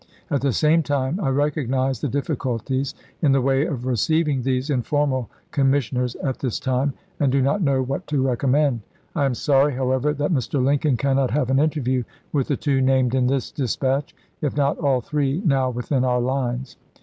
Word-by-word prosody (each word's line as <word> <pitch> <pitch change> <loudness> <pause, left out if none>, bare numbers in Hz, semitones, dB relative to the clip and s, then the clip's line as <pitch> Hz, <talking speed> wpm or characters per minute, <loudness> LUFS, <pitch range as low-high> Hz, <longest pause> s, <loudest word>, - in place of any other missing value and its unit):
At 140 - +1
the 140 0 +1
same 155 +7 +3
time 145 +2 -1
I 155 -9 0
recognize 135 -3 0
the - - 0
difficulties 135 -1 -2 0.3
in 145 -5 +4
the 135 - +3
way 135 +3 +2
of 130 -7 -4
receiving 140 +3 +1
these 130 +3 -1
informal 130 -1 0 0.2
commissioners 135 -3 +1
at 130 -3 -3
this 130 -5 -2
time, 130 +2 0 0.3
and 140 -3 +2
do 135 - +2
not 140 +9 +1
know 135 -5 +2
what 135 +2 -4
to 150 -2 0
recommend. 130 0 +1 0.3
I 145 -4 +2
am 135 -2 0
sorry, 140 +2 +3
however, 130 +2 +1
that 145 +4 0
Mr. 135 0 0
Lincoln 140 0 +2
cannot 135 -1 +1
have 130 -2 0
an 135 - +3
interview 135 -5 +1 0.3
with 140 -4 +1
the 140 - 0
two 140 -3 +1
named 130 -2 +2
in 130 -1 +2
this 135 0 -1
dispatch, 135 +1 -1 0.3
if 150 -2 -2
not 140 -1 +1
all 135 -5 +2
three 145 +3 -1
now 135 -4 +2
within 125 +2 -1
our 125 -1 +2
lines. 125 0 -2
135 Hz, 185 wpm, -22 LUFS, 130-145 Hz, 0.3 s, in